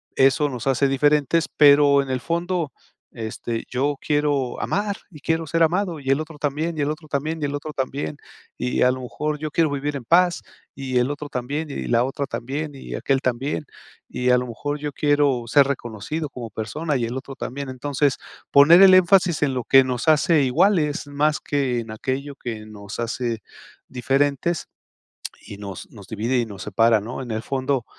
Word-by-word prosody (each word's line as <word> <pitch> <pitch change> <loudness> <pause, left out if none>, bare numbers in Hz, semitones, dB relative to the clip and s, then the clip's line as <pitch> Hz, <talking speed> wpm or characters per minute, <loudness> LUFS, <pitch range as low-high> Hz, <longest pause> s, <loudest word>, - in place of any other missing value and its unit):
Eso 135 +2 +3
nos 125 -4 -6
hace 135 +1 +2
diferentes, 145 +3 +2
pero 145 -1 +6
en 135 - -6
el 130 - -1
fondo, 170 +1 -2 0.4
este, 115 0 -5
yo 140 +3 -1
quiero 145 -4 0
amar 205 0 -1
y 155 - -13
quiero 160 +3 -1
ser 165 +2 +1
amado 175 0 0
y 135 - -12
el 140 +3 +2
otro 155 -1 -9
también 155 +3 -2
y - - -1
el 145 - 0
otro 155 0 -6
también 155 +3 -2
y - - 0
el 140 - -3
otro 145 +1 -5
también 135 +3 -3 0.4
y 125 0 0
a 125 - +5
lo 130 0 -5
mejor 150 +4 -3
yo 155 0 -5
quiero 160 0 +2
vivir 145 0 -2
en 120 - -10
paz 175 +6 +3 0.3
y 130 -2 -2
el 125 +3 +2
otro 145 0 -6
también 145 +4 -4
y 140 - -5
la 120 +1 +3
otra 135 +2 -3
también 140 +4 -4
y 135 - -8
aquél 135 -1 +1
también. 130 +4 -2 0.4
Y 125 0 -1
a 125 - +6
lo 125 0 -2
mejor 145 +5 -4
yo 145 -1 -4
quiero 145 -4 +2
ser 140 +2 +5
reconocido 140 +4 -4
como 120 -4 -7
persona 145 +9 -3
y 125 - 0
el 120 +3 -3
otro 135 0 -8
también. 140 +2 -5
Entonces 135 +1 0 0.3
poner 150 +6 +7
el 190 -1 +9
énfasis 185 -2 +4
en 135 -3 0
lo 125 - -3
que 135 0 +6
nos 125 +2 -3
hace 155 0 +4
iguales 150 +3 +2
más 150 +2 0
que 135 -4 -1
en 115 -1 -9
aquello 135 +5 -4
que 110 -5 -6
nos 105 -1 -9
hace 115 -1 -2 0.5
diferentes 140 +6 0 0.8
y 100 - -8
nos 100 -3 -8
nos 100 -4 -13
divide 115 +4 -1
y 120 - +1
nos 100 -3 -10
separa, 115 +2 +3
¿no? 120 +5 -6
En 120 - -8
el 110 0 -2
fondo, 130 0 -1
140 Hz, 195 wpm, -23 LUFS, 125-150 Hz, 0.8 s, el